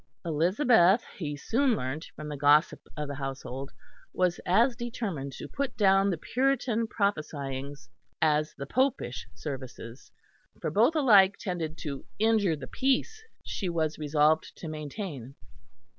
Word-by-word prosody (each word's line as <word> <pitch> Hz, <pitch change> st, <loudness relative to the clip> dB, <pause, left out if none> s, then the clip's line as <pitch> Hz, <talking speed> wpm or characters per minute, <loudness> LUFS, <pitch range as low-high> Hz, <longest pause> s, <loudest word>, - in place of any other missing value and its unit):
Elizabeth, 185 Hz, -, +4 dB
he 150 Hz, -5 st, -4 dB
soon 240 Hz, -, +1 dB
learnt 140 Hz, 0 st, -4 dB
from 155 Hz, -, -7 dB
the 150 Hz, -, -4 dB
gossip 145 Hz, +2 st, +4 dB, 0.2 s
of 150 Hz, -1 st, -3 dB
the 140 Hz, -, -5 dB
household, 135 Hz, -1 st, -5 dB, 0.4 s
was 180 Hz, -1 st, +1 dB
as 235 Hz, +7 st, +4 dB
determined 215 Hz, -, -4 dB
to -, -, -8 dB
put 280 Hz, -2 st, -4 dB
down 195 Hz, -2 st, +4 dB
the 175 Hz, -, -1 dB
Puritan 245 Hz, -, 0 dB
"prophesyings" 145 Hz, -, -3 dB, 0.3 s
as 155 Hz, -1 st, +1 dB
the 140 Hz, -, -6 dB
popish 140 Hz, -, -1 dB
services; 130 Hz, -4 st, -8 dB, 0.5 s
for -, -, -2 dB
both 235 Hz, -, +3 dB
alike 205 Hz, -10 st, +6 dB
tended 165 Hz, -4 st, -4 dB
to 140 Hz, -3 st, -5 dB
injure 215 Hz, -5 st, +3 dB
the 140 Hz, -3 st, -8 dB
peace 275 Hz, -, 0 dB, 0.2 s
she 190 Hz, -, -3 dB
was 160 Hz, -2 st, -1 dB
resolved 155 Hz, +1 st, +2 dB
to 165 Hz, -, -7 dB
maintain. 150 Hz, -, -6 dB
160 Hz, 135 wpm, -28 LUFS, 145-220 Hz, 0.5 s, alike